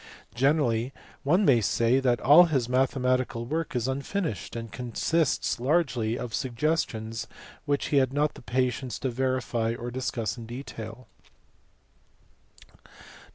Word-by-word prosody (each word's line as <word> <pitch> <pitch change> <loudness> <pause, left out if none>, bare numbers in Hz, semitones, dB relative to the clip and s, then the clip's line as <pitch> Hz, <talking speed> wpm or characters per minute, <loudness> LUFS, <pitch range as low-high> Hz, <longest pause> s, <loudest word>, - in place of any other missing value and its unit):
Generally 130 -2 +1 0.3
one 175 +9 +3
may 120 -7 +5
say 115 +4 +2
that 125 -3 +2
all 155 +7 +8
his 135 -8 0
mathe 130 +2 +1
matical 125 -2 0
work 160 +2 -2
is 120 0 0
unfinished 140 - -3
and 115 -2 -6
consists 135 +4 0
largely 125 -5 +1
of 120 -2 -6
suggestions 120 -4 -1 0.4
which 145 -1 0
he 145 - +2
had 130 -2 +3
not 145 +2 +1
the - - -13
patience 125 0 -1
to 130 - -2
verify 120 -2 -1
or 120 +1 -6
discuss 120 -3 -3
in 115 - -8
detail. 120 -1 -8
125 Hz, 130 wpm, -27 LUFS, 115-140 Hz, 0.4 s, all